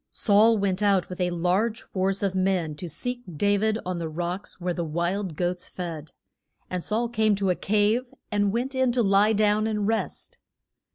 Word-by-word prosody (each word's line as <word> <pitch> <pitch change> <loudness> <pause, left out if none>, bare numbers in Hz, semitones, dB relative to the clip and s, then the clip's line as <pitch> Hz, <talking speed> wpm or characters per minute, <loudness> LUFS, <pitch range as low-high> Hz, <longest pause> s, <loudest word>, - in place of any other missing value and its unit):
Saul 220 +2 +4
went 195 -1 0
out 200 -3 +2
with 180 0 -5
a 180 - +2
large 180 +6 0
force 195 +1 -1
of 195 -2 +1
men 185 -4 0
to 175 +2 -6
seek 245 - -4 0.2
Da 205 +5 +3
vid 215 +1 +1
on 180 -1 -2
the 165 -1 -3
rocks 175 +5 -4
where 180 0 -1
the 170 - -2
wild 170 +3 -2
goats 175 +2 -2
fed. 165 -4 -6 0.6
And 180 -2 -2
Saul 225 +3 0
came 220 -3 +2
to 195 -1 +1
a - - +1
cave, 215 +6 +1 0.2
and 205 -1 +2
went 245 +5 -2
in 260 -1 +2
to 240 -1 +2
lie 200 +2 +4
down 215 +1 +2
and 210 -2 -1
rest. 225 0 -3
200 Hz, 190 wpm, -26 LUFS, 180-215 Hz, 0.6 s, Saul